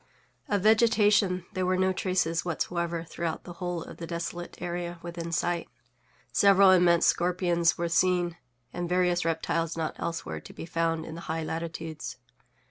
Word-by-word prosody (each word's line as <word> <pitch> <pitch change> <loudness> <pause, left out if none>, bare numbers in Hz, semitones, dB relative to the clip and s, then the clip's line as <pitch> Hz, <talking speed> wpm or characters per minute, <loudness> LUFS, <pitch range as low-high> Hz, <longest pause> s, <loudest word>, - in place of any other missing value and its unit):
Of 205 -2 +1
vegetation 210 -4 +4
there 185 - -1
were 185 0 +2
no 190 0 +2
traces 180 -3 0
whatsoever 170 0 -2
throughout 165 0 -4
the 175 - -9
whole 175 -2 -2
of - - -11
the 165 - -6
desolate 175 +1 -5
area 175 0 -4
within 170 -1 -5
sight. 170 0 -1 0.6
Several 195 +6 +6
immense 175 -2 +5
scorpions 175 -1 +2
were 170 - -1
seen, 175 0 +2 0.4
and 175 -1 -3
various 180 -1 +2
reptiles 165 0 -1
not 160 -1 -2
elsewhere 165 -1 -4
to - - -13
be - - -7
found 165 -1 -1
in 160 - -7
the 170 - -7
high 160 0 -1
latitudes. 160 -3 -5
170 Hz, 155 wpm, -28 LUFS, 165-180 Hz, 0.6 s, Several